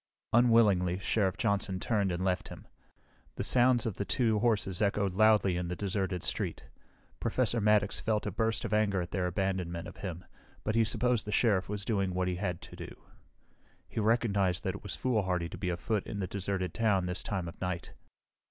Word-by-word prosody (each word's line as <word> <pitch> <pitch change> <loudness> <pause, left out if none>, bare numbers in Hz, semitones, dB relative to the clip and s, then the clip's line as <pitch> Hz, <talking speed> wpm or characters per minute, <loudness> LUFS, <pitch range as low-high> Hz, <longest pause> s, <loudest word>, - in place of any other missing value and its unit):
Unwillingly, 105 -7 +4
Sheriff 95 -1 0
Johnson 100 -3 0
turned 100 -2 0
and 90 +2 -2
left 90 -2 0
him. - - -10 0.7
The - - -3
sounds 125 -1 +3
of 110 -5 -3
the - - -1
two 110 -1 +1
horses 105 -4 +1
echoed 100 -2 +1
loudly 105 -3 +4
in 90 -1 -2
the 90 - -3
deserted 95 -2 -2
street. - - -2 0.6
Professor 120 -2 0
Maddox 105 -1 +3
felt 110 -1 0
a 105 - -2
burst 115 +4 -1
of 110 - -3
anger 105 -3 +2
at 85 - -9
their 90 -2 0
abandonment 90 -2 -2
of - - -11
him, 90 -3 -6 0.4
but 110 - -1
he 115 0 +4
supposed 120 0 0
the - - -2
Sheriff 105 -4 +2
was 100 -1 -3
doing 95 -5 0
what 90 0 0
he 90 -1 -1
had 90 -3 -3
to - - -11
do. - - -8 0.9
He - - -4
recognized 105 -5 +2
that - - -1
it - - -8
was - - -5
foolhardy 95 -9 0
to - - -8
be 95 -3 -1
afoot 95 +4 -2
in - - -5
the 100 - -1
deserted 95 -1 -3
town 105 -5 +2
this 90 +1 -3
time 95 -4 -3
of 85 - -10
night. 90 -3 -3
100 Hz, 195 wpm, -31 LUFS, 90-110 Hz, 0.9 s, Unwillingly